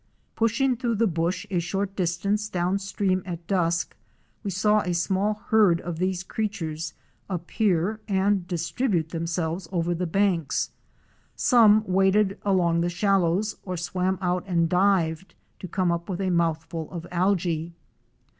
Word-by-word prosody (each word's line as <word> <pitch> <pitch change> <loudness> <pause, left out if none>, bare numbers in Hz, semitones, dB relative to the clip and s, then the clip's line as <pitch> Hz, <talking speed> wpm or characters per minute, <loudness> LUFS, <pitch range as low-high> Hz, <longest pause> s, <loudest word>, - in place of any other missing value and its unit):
Pushing 235 +4 +2
through 235 -1 -1
the 230 +2 +2
bush 170 +2 -1
a 180 - +1
short 195 +3 -2
distance 200 +4 -1
downstream 190 +1 0
at 170 -2 -7
dusk, 175 -2 0 0.5
we 205 - -2
saw 210 +3 +2
a 180 -2 -2
small 195 +4 +1
herd 205 -7 +5
of 170 -2 -5
these 185 0 -1
creatures 165 -7 -4 0.3
appear 190 +2 0
and 195 -2 +1
distribute 175 +1 -1
themselves 165 +1 -3
over 175 -1 0
the 175 +1 -2
banks. 180 -4 0 0.6
Some 215 -4 +5
waded 195 +1 +2
along 175 -4 +2
the 175 - +1
shallows, 195 +2 +1
or 185 -2 -4
swam 185 +2 -1
out 180 0 0
and 170 -3 +2
dived, 180 -1 +1 0.2
to 185 - -6
come 180 0 0
up 170 +2 -3
with 185 -1 -3
a 190 -1 0
mouthful 165 -1 -1
of 170 -2 -7
alge. 175 -3 0
185 Hz, 140 wpm, -25 LUFS, 170-200 Hz, 0.6 s, herd